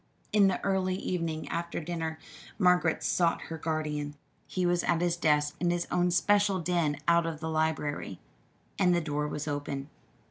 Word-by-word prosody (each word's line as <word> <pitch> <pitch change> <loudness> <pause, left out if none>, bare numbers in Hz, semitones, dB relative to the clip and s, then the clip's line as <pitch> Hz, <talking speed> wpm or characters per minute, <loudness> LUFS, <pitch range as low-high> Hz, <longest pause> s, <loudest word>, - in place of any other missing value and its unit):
In 205 -2 +6
the 190 - 0
early 190 -1 +1
evening 165 -4 -3
after 170 +1 -3
dinner 165 -1 -3 0.4
Margaret 180 -4 +3
sought 170 -2 +2
her 160 - -4
guardian. 150 -2 -2 0.3
He 185 -1 -1
was 175 0 +2
at 170 -1 +2
his 175 -1 +1
desk 150 -3 +2
in 175 - +1
his 175 0 0
own 180 0 +2
special 200 +2 +3
den 170 -4 0
out 170 0 +4
of 160 -2 -4
the 160 0 -4
library, 155 - -1 0.6
and 180 -2 +4
the - - +3
door 150 -1 -2
was 150 0 -4
open. 145 -1 -4
165 Hz, 170 wpm, -29 LUFS, 150-180 Hz, 0.6 s, In